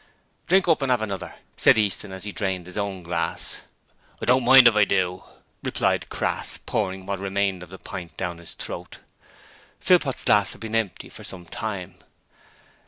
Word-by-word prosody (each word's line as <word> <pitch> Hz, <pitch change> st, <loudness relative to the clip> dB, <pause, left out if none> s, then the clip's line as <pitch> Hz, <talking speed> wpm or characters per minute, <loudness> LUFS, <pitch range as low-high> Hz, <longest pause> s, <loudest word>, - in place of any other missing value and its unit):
'Drink 190 Hz, +1 st, +4 dB
up 165 Hz, -3 st, +3 dB
and 135 Hz, -2 st, +1 dB
'ave 125 Hz, -3 st, +2 dB
another,' 100 Hz, -4 st, -5 dB, 0.2 s
said -, -, +5 dB
Easton 105 Hz, -1 st, 0 dB
as 95 Hz, -1 st, -7 dB
he 105 Hz, -, -4 dB
drained 95 Hz, -3 st, -2 dB
his 90 Hz, -, -8 dB
own 100 Hz, -3 st, -3 dB
glass. 85 Hz, +1 st, -3 dB, 0.6 s
'I -, -, -4 dB
don't 125 Hz, +1 st, +4 dB
mind 130 Hz, 0 st, +9 dB
if 115 Hz, -, +5 dB
I 105 Hz, -, +6 dB
do,' 95 Hz, -2 st, 0 dB, 0.4 s
replied -, -, 0 dB
Crass, -, -, -1 dB
pouring 95 Hz, -3 st, -3 dB
what 100 Hz, 0 st, -3 dB
remained 100 Hz, -1 st, -1 dB
of 90 Hz, -, -10 dB
the 95 Hz, -, -10 dB
pint 85 Hz, -5 st, -8 dB
down 90 Hz, -2 st, -3 dB
his 85 Hz, -, -10 dB
throat. -, -, -7 dB, 0.8 s
Philpot's -, -, +3 dB
glass -, -, +3 dB
had -, -, -16 dB
been 110 Hz, -1 st, -6 dB
empty 110 Hz, -4 st, -1 dB
for -, -, -12 dB
some 90 Hz, -2 st, -8 dB
time. 95 Hz, -2 st, -5 dB
100 Hz, 175 wpm, -24 LUFS, 90-110 Hz, 0.8 s, mind